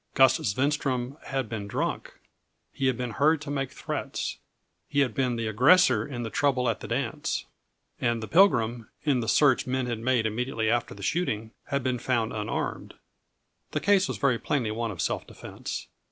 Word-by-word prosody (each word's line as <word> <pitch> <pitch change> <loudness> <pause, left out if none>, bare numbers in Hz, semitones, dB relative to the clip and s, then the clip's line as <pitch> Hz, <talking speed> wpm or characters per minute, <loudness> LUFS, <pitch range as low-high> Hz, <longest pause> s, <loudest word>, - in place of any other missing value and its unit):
Gus 130 -2 +6
Svenstrom 130 +2 0
had 135 -3 -2
been 105 -2 -5
drunk; - - -3 0.6
he 135 - 0
had 130 -2 +1
been 125 -2 -3
heard 150 +7 +3
to 145 -2 -5
make 135 -2 -1
threats; - - -4 0.5
he 145 -1 +2
had 130 -5 +1
been 125 -1 0
the 115 -1 -2
aggressor 125 - +5
in 120 -4 -5
the 110 - -5
trouble 130 -3 +1
at 115 - 0
the - - -7
dance; - - -2 0.5
and 120 -1 0
the - - -4
Pilgrim, 120 - +3
in 140 -5 +2
the 115 - -3
search 135 -2 +4
men 130 0 0
had 120 -2 -3
made 120 -1 +1
immediately 110 0 0
after 120 -4 -1
the 100 - -10
shooting, 110 - -1
had 140 -2 -1
been 130 -1 0
found 115 -2 0
unarmed. 105 -1 -3 0.8
The - - +1
case 200 -1 +3
was - - -3
very 130 -4 +2
plainly 125 -7 -1
one 115 +1 -2
of 90 -6 -3
self - - -2
defense. - - -7
125 Hz, 180 wpm, -27 LUFS, 115-140 Hz, 0.8 s, Gus